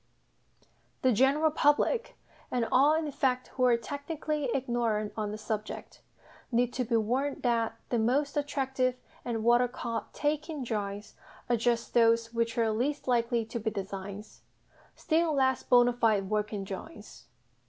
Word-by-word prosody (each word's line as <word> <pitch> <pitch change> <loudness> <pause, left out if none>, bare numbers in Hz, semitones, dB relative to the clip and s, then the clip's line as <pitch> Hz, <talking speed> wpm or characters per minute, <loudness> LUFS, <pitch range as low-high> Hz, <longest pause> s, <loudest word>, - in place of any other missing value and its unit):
The 260 - +5
general 275 +7 +3
public, 300 +11 +2 0.3
and 240 -2 0
all 285 +4 +5
in 315 -2 -1
fact 255 -2 0
who 255 - 0
are 240 -2 +5
technically 285 +2 -3
ignorant 235 -5 -1
on 215 -2 -2
the 210 - -5
subject, 215 0 -5 0.5
need 245 +1 +1
to 255 - -1
be 235 0 -1
warned 255 +6 -1
that 230 -2 +1
the 240 - +1
most 275 +6 +1
attractive 265 -3 0 0.3
and 225 -2 -3
what 240 +1 +5
are 250 - +2
called 235 -1 -4
"taking" 300 0 -2
drawings 205 -3 -4 0.4
are - - +5
just 235 0 0
those 230 0 +3
which 230 0 -1
are 225 -2 +2
least 265 +7 -2
likely 235 -2 +1
to 235 +2 -5
be 220 0 -1
designs 200 0 -7 0.5
still 320 -1 +1
less 260 -2 +2
bonâ 245 -1 +4
fide 215 -4 +1
working 210 -1 -1
drawings. 195 - -9
240 Hz, 150 wpm, -29 LUFS, 225-275 Hz, 0.5 s, The